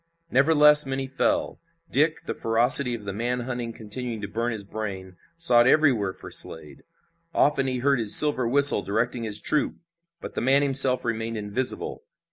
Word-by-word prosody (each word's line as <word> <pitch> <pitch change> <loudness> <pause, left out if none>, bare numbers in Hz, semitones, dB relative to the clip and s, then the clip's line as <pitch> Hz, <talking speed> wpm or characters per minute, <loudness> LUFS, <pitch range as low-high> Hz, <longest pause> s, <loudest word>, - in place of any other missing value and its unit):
Nevertheless 150 +1 +4
many 135 0 -4
fell. 290 - -3 0.3
Dick, 155 +4 0
the - - -5
ferocity 120 +3 +1
of 105 -3 -12
the 100 - -6
man 120 +4 -4
hunt 120 -2 -7
continuing 115 +1 -7
to - - -4
burn 115 +4 -4
his 110 -2 -6
brain, 95 -3 -8 0.2
sought 120 -8 +3
everywhere 130 -10 +1
for - - -13
Slade. 80 -2 -2 0.5
Often 140 -2 0
he 130 -1 -3
heard 135 +1 -1
his 110 -2 +3
silver 145 -5 +5
whistle 140 -3 +5
directing 115 +4 -4
his 105 -2 -2
troop, 150 - -2 0.4
but - - -10
the - - -5
man 135 +3 +1
himself 135 -2 +5
remained 115 -1 -5
invisible. 105 +5 -4
125 Hz, 165 wpm, -23 LUFS, 110-140 Hz, 0.5 s, silver